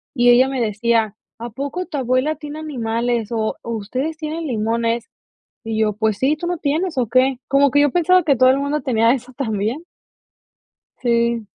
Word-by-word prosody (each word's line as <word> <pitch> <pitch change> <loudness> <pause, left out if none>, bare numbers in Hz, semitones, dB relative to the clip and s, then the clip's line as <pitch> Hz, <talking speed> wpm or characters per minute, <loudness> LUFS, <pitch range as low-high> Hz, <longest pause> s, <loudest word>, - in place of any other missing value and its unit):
Y 245 -1 +4
ella 250 +2 +6
me 265 -2 -2
decía: 220 0 0 0.2
"¿A 235 +1 -6
poco 285 +10 -4
tu 300 - -5
abuela 260 +4 +1
tiene 300 0 -8
animales 235 -5 -2
o 220 -1 -1
o 235 - -6
ustedes 260 +9 -3
tienen 315 +1 -4
limones?", 230 0 -1 0.5
y 225 -1 -3
yo: 215 -1 +2
"Pues 215 -1 0
sí, 280 +4 +2
¿tú 345 - -6
no 355 -1 -1
tienes 315 +2 -1
o 245 -3 +1
qué?". 255 +2 +2
Como 275 -1 +3
que 285 - +3
yo 290 - +4
pensaba 360 +2 +3
que 285 -4 +3
todo 255 +1 +5
el 265 - +4
mundo 285 +2 -1
tenía 230 -3 +3
eso 255 -1 -5
también. 225 +2 -2 1.2
Sí. 235 -2 +1
255 Hz, 185 wpm, -20 LUFS, 230-290 Hz, 1.2 s, ella